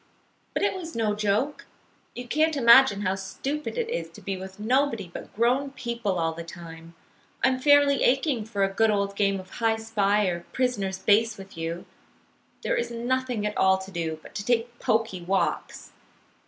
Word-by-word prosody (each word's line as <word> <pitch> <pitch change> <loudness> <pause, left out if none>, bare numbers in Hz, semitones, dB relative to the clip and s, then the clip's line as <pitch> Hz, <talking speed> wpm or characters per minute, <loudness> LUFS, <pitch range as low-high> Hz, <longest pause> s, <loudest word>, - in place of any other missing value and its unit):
But - - 0
it 405 - +2
was 335 -3 -7
no 220 -2 +1
joke. 215 +7 -1 0.5
You 245 0 -7
can't 310 +3 +2
imagine 235 -4 +7
how 190 -1 +1
stupid 270 - -4
it 475 -2 0
is 485 +2 -3
to - - -12
be 195 -2 -3
with 190 +1 -9
nobody 230 -4 0
but - - -8
grown 250 +5 +2
people 235 -7 -2
all 165 -1 0
the 170 +1 -7
time. 165 -1 -11 0.5
I'm 260 0 +3
fairly 285 0 +5
aching 265 -3 +2
for 205 -3 -1
a 195 0 0
good 225 +2 +3
old 200 -1 0
game 195 -1 +1
of 185 0 -12
hi 225 -1 +1
spy 210 -2 +1
or 175 -2 -1
prisoner's 210 -7 -1
base 220 +4 +3
with 195 -1 -11
you. 165 +1 -4 0.8
There - - 0
is 475 - -1
nothing 240 -1 -1
at 210 - -2
all 190 0 +4
to 190 +1 -9
do, 165 -3 -3
but - - -13
to 200 - -4
take 240 +1 0
poky 220 -5 0
walks. 190 +2 -2
215 Hz, 180 wpm, -26 LUFS, 190-255 Hz, 0.8 s, imagine